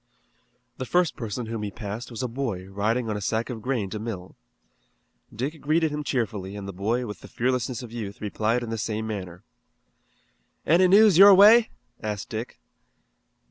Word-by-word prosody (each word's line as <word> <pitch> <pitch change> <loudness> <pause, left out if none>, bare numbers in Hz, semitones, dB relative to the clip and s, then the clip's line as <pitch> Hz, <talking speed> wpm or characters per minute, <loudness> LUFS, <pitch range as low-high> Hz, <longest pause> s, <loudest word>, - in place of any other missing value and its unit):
The 130 - -5
first 175 -2 +2
person 115 -2 -5
whom 115 -1 -5
he 105 - -3
passed 105 +3 -7
was 115 0 -5
a - - 0
boy 115 -7 -4
riding 110 +5 -1
on 110 - -2
a 105 - -4
sack 110 +5 -1
of 115 -3 -6
grain 125 -4 -1
to 105 - -4
mill. 105 -5 -6 1.0
Dick 140 +7 -5
greeted 155 +2 +1
him 150 0 -3
cheerfully 105 -8 -3
and 100 -1 -7
the 100 - -6
boy 110 +7 -1
with 105 -2 -7
the - - -12
fearlessness 125 0 -2
of 120 - -10
youth 105 -4 -6
replied 110 +3 -1
in 115 - -5
the 115 - -3
same 110 +1 -3
manner. 95 -4 -6 1.2
"Any 175 +4 +5
news 200 -1 +6
your 200 0 +10
way?" 220 +4 +7 0.3
asked 105 -2 -4
Dick. 115 +3 -6
115 Hz, 180 wpm, -25 LUFS, 105-135 Hz, 1.2 s, your